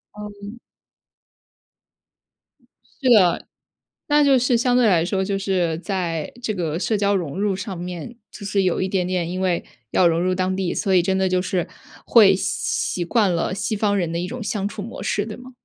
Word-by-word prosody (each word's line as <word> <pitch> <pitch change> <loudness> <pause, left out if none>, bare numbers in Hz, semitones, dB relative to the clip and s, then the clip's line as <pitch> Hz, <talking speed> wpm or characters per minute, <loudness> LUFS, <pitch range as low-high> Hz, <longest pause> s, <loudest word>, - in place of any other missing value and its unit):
嗯。 210 +2 -9 2.4
是 260 - +3
的， 190 -8 +4 0.6
那 295 0 +4
就 275 -2 +5
是 245 0 +2
相 245 +1 +2
对 245 -2 +4
来 170 -5 +3
说 190 +1 -1
就 195 0 -1
是 185 -5 0
在 170 -4 -3
这 230 - -2
个 165 -3 -2
社 215 +3 0
交 200 0 +2
融 175 -2 -3
入 200 -1 +1
上 190 -1 -5
面， 180 +5 -7 0.2
就 210 - -10
是 200 -1 0
有 180 -2 0
一 185 - 0
点 185 -2 0
点， 180 -2 -1
因 185 +1 -4
为 185 -2 0 0.3
要 180 - +4
融 165 0 +1
入 185 +1 +1
当 185 0 -1
地， 190 -2 -1
所 195 - 0
以 180 - +4
真 190 +2 0
的 190 0 +1
就 185 0 +2
是 180 -2 -2 0.4
会 205 -5 +7
习 - - -5 0.5
习 175 - -2
惯 210 0 +2
了 170 +2 -1
西 200 +3 -2
方 205 -1 +1
人 175 -4 -1
的 170 - -2
一 175 +1 -2
种 245 +1 -6
相 205 -1 -2
处 205 0 -7
模 230 +4 -7
式， 205 +1 -1
对 215 - -7
吗？ 250 +1 -12
190 Hz, 220 characters per minute, -22 LUFS, 180-210 Hz, 2.4 s, 会